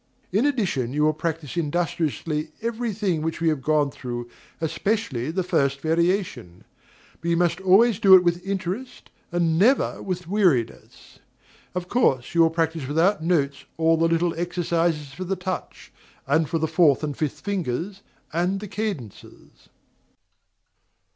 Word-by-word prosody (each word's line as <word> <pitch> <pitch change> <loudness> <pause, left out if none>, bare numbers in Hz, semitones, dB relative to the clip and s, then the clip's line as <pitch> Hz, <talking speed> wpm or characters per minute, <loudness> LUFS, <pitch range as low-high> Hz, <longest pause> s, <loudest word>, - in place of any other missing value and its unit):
In 215 +10 +2
addition, 180 - -1
you 150 +1 +1
will 155 0 +3
practise 160 -1 -4
industriously 160 -1 -2
every 235 0 -2
thing 190 -6 -1
which 160 0 -3
we 165 -1 +2
have 155 -4 -1
gone 150 0 +1
through, 120 -3 -6 0.3
especially 165 - -1
the 185 +3 -1
first 140 -5 +1
variation; 165 - -1 0.6
but 170 - -2
you 170 - +2
must 175 +1 +1
always 200 +3 +4
do 190 -1 +8
it 180 - +6
with 175 0 0
interest, 195 +6 -5 0.2
and 170 -2 +1
never 250 +8 +3
with 180 -2 -4
weariness. 175 - -1 0.6
Of 180 -1 -3
course 135 - +1
you 170 - +4
will 165 - +6
practise 160 -3 -1
without 165 +6 +2
notes 145 -5 0
all 165 0 +3
the 165 +1 +2
little 165 +1 +1
exercises 170 -4 -1
for 185 - -6
the 190 +1 -2
touch, 185 0 -6 0.3
and 155 +2 +1
for 165 - 0
the 160 0 0
fourth 160 -3 +3
and 145 -2 -2
fifth 150 -1 -3
fingers, 190 0 -3 0.3
and 180 +4 0
the 210 - -7
cadences. 190 - -7
170 Hz, 150 wpm, -24 LUFS, 155-185 Hz, 0.6 s, do